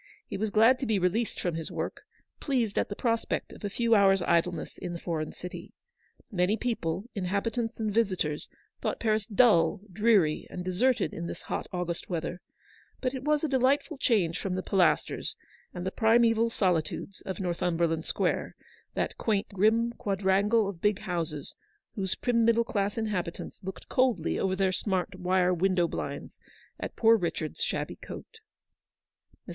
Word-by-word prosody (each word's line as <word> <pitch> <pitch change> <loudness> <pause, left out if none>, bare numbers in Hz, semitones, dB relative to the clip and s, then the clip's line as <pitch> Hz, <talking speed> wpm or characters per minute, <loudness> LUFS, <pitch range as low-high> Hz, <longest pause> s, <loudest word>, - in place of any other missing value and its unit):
He - - -6
was 215 +2 -1
glad 225 +5 +5
to 265 - -2
be 215 -2 +2
released 195 +5 0
from 175 - -1
his 160 -1 -3
work, - - -4 0.4
pleased 240 -8 0
at - - -1
the 205 - -4
prospect 230 0 -1
of - - -13
a 205 - -1
few 235 +3 -1
hours^idlenessln 180 -3 +2
the 170 - -5
foreign 160 -3 -3
city. 180 - -9 0.6
Many 190 +2 +2
people, 200 -7 -2
inhabitants 220 +5 -2
and 215 -2 -1
visitors, 185 -9 0 0.3
thought - - -2
Paris 215 -2 +1
dull, 200 -7 +4
dreary, 205 -7 +3
and 180 - -6
deserted 230 +8 +1
in 170 +1 -4
this - - -7
hot - - -3
August 180 -2 -3
weather, 175 0 -3 0.6
but 255 0 -1
it 260 - -4
was 300 +1 +2
a - - +2
delightful 275 +3 +1
change 190 - +2
from 185 -2 -2
the 185 - -2
Pilasters 190 -3 +1 0.4
and 175 - -6
the 190 - -1
primseval 230 +1 +4
solitudes 185 -1 -1
of 190 -2 -3
Northum 175 -2 -1
berland 165 -1 +1
Square, - - -1 0.4
that - - -2
quaint, 210 -2 0
grim 220 +4 +2
quadrangle 200 +2 +2
of 185 -4 -6
big 210 -2 +2
houses, 165 -5 -3 0.4
whose 190 -3 -1
prim 235 -2 +1
middle 230 0 +4
class 205 -2 -1
inhabitants 205 -4 -3
looked 190 +1 -7
coldly 255 -2 +1
over 190 -1 +1
their 190 0 +2
smart 185 -1 -1
wire 180 0 +2
window 180 0 +2
blinds - - -5 0.4
at - - -5
poor 225 0 +6
Richard's 165 -6 -3
shabby - - -2
coat. 450 - -10 1.1
Mr. - - -8
195 Hz, 160 wpm, -29 LUFS, 180-230 Hz, 1.1 s, poor